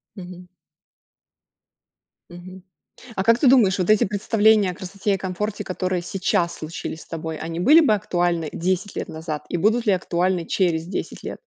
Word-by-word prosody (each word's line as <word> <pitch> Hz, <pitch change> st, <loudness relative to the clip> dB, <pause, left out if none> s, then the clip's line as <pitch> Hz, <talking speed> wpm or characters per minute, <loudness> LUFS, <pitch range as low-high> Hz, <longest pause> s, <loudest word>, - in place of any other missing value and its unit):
Мгм. 180 Hz, -2 st, -10 dB, 1.8 s
Мгм. 180 Hz, +1 st, -12 dB, 0.5 s
А 190 Hz, -, -1 dB
как 230 Hz, +2 st, +4 dB
ты 270 Hz, -, +3 dB
думаешь, 215 Hz, -7 st, +5 dB
вот 180 Hz, -, -1 dB
эти 215 Hz, -1 st, +5 dB
представления 210 Hz, 0 st, +2 dB
о -, -, -8 dB
красоте 195 Hz, +3 st, -3 dB
и -, -, -4 dB
комфорте, 195 Hz, +3 st, -4 dB
которые 185 Hz, -1 st, -2 dB
сейчас 175 Hz, -1 st, -1 dB
случились 160 Hz, 0 st, -6 dB
с -, -, -14 dB
тобой, 160 Hz, -1 st, -5 dB
они 165 Hz, +1 st, -5 dB
были 300 Hz, -, +7 dB
бы 285 Hz, -10 st, +4 dB
актуальны 175 Hz, -6 st, -1 dB
10 185 Hz, +3 st, -2 dB
лет -, -, -3 dB
назад? 160 Hz, -2 st, -6 dB
И -, -, -3 dB
будут 225 Hz, +6 st, +1 dB
ли 205 Hz, -, +4 dB
актуальны 180 Hz, -1 st, 0 dB
через 170 Hz, -4 st, 0 dB
10 185 Hz, -, -6 dB
лет? -, -, -6 dB
185 Hz, 165 wpm, -22 LUFS, 175-205 Hz, 1.8 s, были